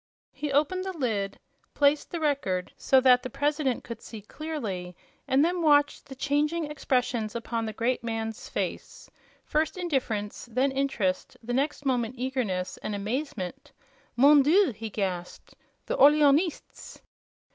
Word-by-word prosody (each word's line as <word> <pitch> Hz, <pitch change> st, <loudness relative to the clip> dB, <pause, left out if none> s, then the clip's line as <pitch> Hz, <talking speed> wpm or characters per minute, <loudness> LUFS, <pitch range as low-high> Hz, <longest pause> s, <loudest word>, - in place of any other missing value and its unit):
He 295 Hz, -1 st, -4 dB
opened 305 Hz, +7 st, +1 dB
the 380 Hz, -2 st, -5 dB
lid, 210 Hz, -8 st, -1 dB, 0.4 s
placed 285 Hz, +1 st, +3 dB
the 340 Hz, -, -4 dB
Record 275 Hz, -, -1 dB
so 265 Hz, -, +4 dB
that 250 Hz, -1 st, +6 dB
the 255 Hz, -, -6 dB
President 285 Hz, -1 st, 0 dB
could 230 Hz, -, -8 dB
see 225 Hz, -, -9 dB
clearly, 210 Hz, -, -5 dB, 0.3 s
and 270 Hz, +3 st, +4 dB
then 350 Hz, +1 st, 0 dB
watched 290 Hz, -2 st, +3 dB
the 270 Hz, -, -9 dB
changing 295 Hz, +3 st, 0 dB
expressions 245 Hz, -6 st, -1 dB
upon 230 Hz, -1 st, -3 dB
the 220 Hz, -, -4 dB
great 240 Hz, +4 st, -1 dB
man's 225 Hz, -1 st, -4 dB
face; -, -, -5 dB, 0.3 s
first 310 Hz, +3 st, 0 dB
indifference, 250 Hz, -, -2 dB
then 260 Hz, +4 st, +2 dB
interest, 265 Hz, -9 st, -1 dB
the 245 Hz, +2 st, -3 dB
next 285 Hz, +2 st, -1 dB
moment 250 Hz, -2 st, 0 dB
eagerness 240 Hz, -8 st, -2 dB
and 210 Hz, -, -4 dB
amazement. 210 Hz, -, -4 dB, 0.4 s
"MON 285 Hz, +3 st, +7 dB
DIEU!" 325 Hz, +4 st, +4 dB
he 220 Hz, +1 st, -6 dB
gasped; 185 Hz, -4 st, -4 dB, 0.3 s
"the -, -, -2 dB
Orleanists!" 295 Hz, +3 st, +3 dB
260 Hz, 140 wpm, -27 LUFS, 220-295 Hz, 0.4 s, MON